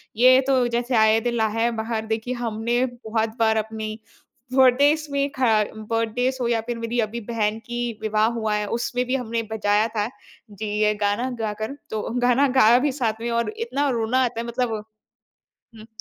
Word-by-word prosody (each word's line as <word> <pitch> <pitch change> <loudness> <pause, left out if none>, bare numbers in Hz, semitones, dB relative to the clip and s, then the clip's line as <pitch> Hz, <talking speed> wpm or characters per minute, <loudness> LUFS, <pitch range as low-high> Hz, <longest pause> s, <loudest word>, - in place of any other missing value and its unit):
ये 255 +3 +6
तो 255 -3 +3
जैसे 240 +1 -1
ऐ 220 0 +5
दिल 240 0 -1
ला 220 - +2
है 230 +1 +2
बहार 220 -1 -3
देखिए, 220 +3 -2
हमने 240 +1 -1
बहुत 225 -3 -2
बार 220 -1 +3
अपनी, 220 0 -4 0.5
बर्थडेज़ 285 +4 +4
में 280 0 0
ख - - +1 0.3
बर्थडेज़ 230 +4 -1
हो 240 - +1
या 230 -1 +1
फिर 240 - -3
मेरी 230 +1 -2
अभी 235 +1 -5
बहन 215 -1 0
की 240 0 -4 0.2
विवाह 215 0 +2
हुआ 220 -1 -1
है, 210 0 -1
उसमें 240 +2 -1
भी 255 +2 -1
हमने 230 -2 -2
बजाया 210 0 +2
था 210 +1 +1 0.4
जी, 215 +2 -6 0.2
ये 210 0 +3
गाना 205 +6 0
गाकर। 220 +4 -3
तो 215 -1 -2 0.2
गाना 250 +3 +3
गाया 235 +2 +6
भी - - 0
साथ 220 -1 0
में 235 - -2
और 235 0 0
इतना 290 -12 -1
रोना 245 +1 +1
आता 235 -1 -4
है 235 - -4
मतलब 235 -3 -2 0.9
हुँ। 215 - -12
230 Hz, 185 wpm, -23 LUFS, 220-245 Hz, 0.9 s, ये